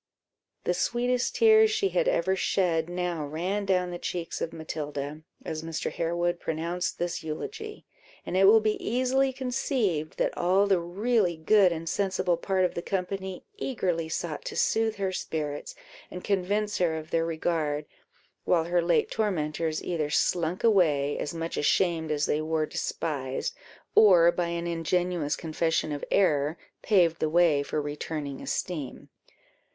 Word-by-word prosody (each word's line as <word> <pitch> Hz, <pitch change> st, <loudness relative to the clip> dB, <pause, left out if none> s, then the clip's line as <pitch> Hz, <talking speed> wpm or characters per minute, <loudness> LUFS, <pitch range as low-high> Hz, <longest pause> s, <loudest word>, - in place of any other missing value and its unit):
The 180 Hz, -, +1 dB
sweetest 245 Hz, +6 st, 0 dB
tears 440 Hz, -1 st, +6 dB
she 410 Hz, -2 st, +1 dB
had -, -, +1 dB
ever 190 Hz, -, +2 dB
shed 175 Hz, -4 st, +1 dB
now 175 Hz, -3 st, -2 dB
ran 180 Hz, +7 st, -2 dB
down 180 Hz, -2 st, +1 dB
the 175 Hz, -, -5 dB
cheeks 170 Hz, -2 st, -4 dB
of 165 Hz, -, -2 dB
Matilda, 150 Hz, -2 st, -5 dB, 0.2 s
as 155 Hz, -1 st, -4 dB
Mr. 160 Hz, 0 st, -3 dB
Harewood 175 Hz, +1 st, -1 dB
pronounced 170 Hz, +3 st, -2 dB
this 175 Hz, 0 st, -2 dB
eulogy; 425 Hz, -, -6 dB, 0.4 s
and -, -, -4 dB
it 190 Hz, +1 st, +5 dB
will 220 Hz, +3 st, +7 dB
be 215 Hz, 0 st, -1 dB
easily 260 Hz, +3 st, +1 dB
conceived, 245 Hz, -, -1 dB
that -, -, 0 dB
all 185 Hz, +3 st, +3 dB
the 195 Hz, -3 st, +3 dB
really 185 Hz, +1 st, 0 dB
good 190 Hz, +3 st, +4 dB
and 165 Hz, 0 st, -4 dB
sensible 185 Hz, -1 st, 0 dB
part 185 Hz, +2 st, +1 dB
of -, -, -1 dB
the 170 Hz, -, -3 dB
company 190 Hz, 0 st, -3 dB
eagerly 180 Hz, -, -2 dB
sought 160 Hz, -1 st, -3 dB
to -, -, -5 dB
soothe 220 Hz, -1 st, +2 dB
her 195 Hz, -2 st, -1 dB
spirits, 150 Hz, -5 st, -4 dB, 0.3 s
and 180 Hz, -, -8 dB
convince 205 Hz, +2 st, 0 dB
her 165 Hz, -3 st, +1 dB
of 155 Hz, 0 st, -8 dB
their 165 Hz, 0 st, +2 dB
regard, 160 Hz, -2 st, -1 dB, 0.6 s
while 170 Hz, -2 st, +2 dB
her 175 Hz, +1 st, +1 dB
late 170 Hz, 0 st, +1 dB
tormentors 160 Hz, -6 st, -1 dB
either 160 Hz, -4 st, -2 dB
slunk 170 Hz, +3 st, 0 dB
away, 155 Hz, -10 st, +3 dB
as -, -, -3 dB
much 165 Hz, 0 st, -4 dB
ashamed 165 Hz, +1 st, +1 dB
as 150 Hz, -1 st, +1 dB
they 150 Hz, -, 0 dB
were 155 Hz, 0 st, 0 dB
despised, 135 Hz, -4 st, -3 dB, 0.4 s
or 175 Hz, -5 st, +7 dB
by 175 Hz, 0 st, -1 dB
an 170 Hz, 0 st, -3 dB
ingenuous 170 Hz, -1 st, 0 dB
confession 160 Hz, -1 st, -1 dB
of 145 Hz, -1 st, -4 dB
error, 150 Hz, -4 st, +2 dB, 0.2 s
paved 175 Hz, -6 st, +3 dB
the 155 Hz, -, 0 dB
way 165 Hz, -3 st, +4 dB
for 145 Hz, -, -2 dB
returning 145 Hz, -1 st, -4 dB
esteem. 150 Hz, -8 st, -4 dB
175 Hz, 155 wpm, -27 LUFS, 160-195 Hz, 0.6 s, will